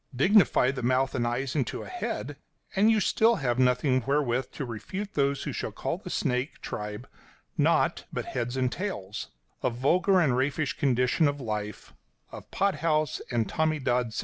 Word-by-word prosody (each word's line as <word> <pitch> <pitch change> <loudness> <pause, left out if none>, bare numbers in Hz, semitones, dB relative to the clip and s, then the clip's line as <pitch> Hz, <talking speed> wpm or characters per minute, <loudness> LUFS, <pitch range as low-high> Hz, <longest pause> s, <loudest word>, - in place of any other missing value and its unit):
Dignify 145 - +4
the 135 -2 -5
mouth 130 +2 +1
and 120 -2 0
eyes 130 +3 -2
into 135 -6 -1
a - - -9
head, 365 - -4 0.4
and 215 +1 +4
still 225 +1 +4
you 225 - -3
have 125 -2 0
nothing 130 +1 +3
wherewith 130 -3 +1
to 140 - -4
refute 185 - -6
those 140 -1 +1
who - - -4
shall - - -3
call - - -3
the - - -9
snake 125 +3 -1
tribe 105 +3 -6 0.5
naught - - +2
but - - -3
heads 120 +1 -3
and 130 -1 +1
tails; 110 - -5 0.3
a - - +2
vulgar 175 +11 +3
and 145 -8 +3
raffish 140 +3 0
condition 125 +3 +2
of 145 0 -2
life, 105 -4 -5 0.4
of - - -10
pot 195 -5 0
house 155 -2 0
and 115 -3 0
Tommy 155 0 0
Dod 125 -3 +1
suggestion. 110 -1 -5
130 Hz, 175 wpm, -28 LUFS, 120-155 Hz, 0.5 s, Dignify